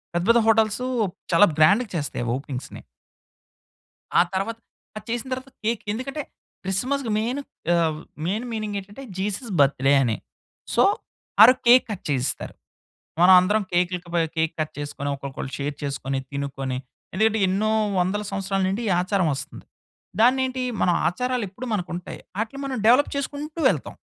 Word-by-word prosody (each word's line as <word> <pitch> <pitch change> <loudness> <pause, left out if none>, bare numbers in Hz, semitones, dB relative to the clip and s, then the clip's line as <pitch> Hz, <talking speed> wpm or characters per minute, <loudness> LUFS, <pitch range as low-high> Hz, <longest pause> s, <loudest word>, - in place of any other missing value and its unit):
పెద్ద, 175 - +1
పెద్ద 235 0 +7
హోటల్సూ 225 +2 +3 0.5
చాలా 190 +5 +7
గ్రాండ్‌గా 200 +9 +4
చేస్తాయి 145 -5 -3
ఒపెనింగ్స్‌ని. 135 -1 -6 1.4
ఆ - - +8
తర్వాత 225 +4 -2 0.4
అది - - -9
చేసిన 240 +2 -2
తర్వాత, 260 +1 -6 0.2
కేక్. 230 -1 0
ఎందుకంటే, 275 +7 -4 0.4
క్రిస్మస్‌కి 240 +6 -1
మెయిన్ 240 +6 -1 0.3
ఆహ్, 160 -2 +1 0.3
మెయిన్ 215 +7 -1
మీనింగ్ 215 -2 -3
ఏటంటే 205 +8 -11 0.2
జీసస్ 210 +3 -3
బర్త్‌డే 135 0 +4
అని. 115 -3 0 0.6
సో, - - +5 0.6
ఆ - - +13
రోజు 255 - +2
కేక్ 250 +2 +7
కట్ 195 - -6
చేయిస్తారు. 130 -2 -2 0.7
మనం 185 +1 +8
అందరం 205 +3 +1
కేకులకు 175 0 0
బై 170 - +4 0.2
కేక్ 160 0 +1
కట్ 155 - -3
చేసుకొని, 145 -1 -4
ఒక్కొక్కళ్ళు 135 -1 -6
షేర్ 145 0 -3
చేసుకొని, 135 -1 -2
తినుకొని 135 -2 -3 0.4
ఎందుకంటే, 220 +2 +2
ఎన్నో 205 +4 +1 0.3
వందల 190 +4 0
సంవత్సరాల 195 0 -1
నుండి 205 +5 -2
ఈ - - +2
ఆచారం 185 -2 +1
వస్తుంది. - - -8 0.5
దాన్ని 250 +3 +5
ఏంటి 255 0 -3 0.2
మన - - +3 0.2
ఆచారాలు 250 +6 -1
ఎప్పుడు 245 +7 -8
మనకు 180 -3 -2
ఉంటాయి. 175 - -7 0.2
ఆటిల్ని 250 +5 -3
మనం 260 -2 -3
డెవలప్ 255 +5 +5
చేసుకుంటూ 290 +3 -4
వెళ్తాం. - - -2
200 Hz, 150 wpm, -24 LUFS, 160-240 Hz, 1.4 s, ఆ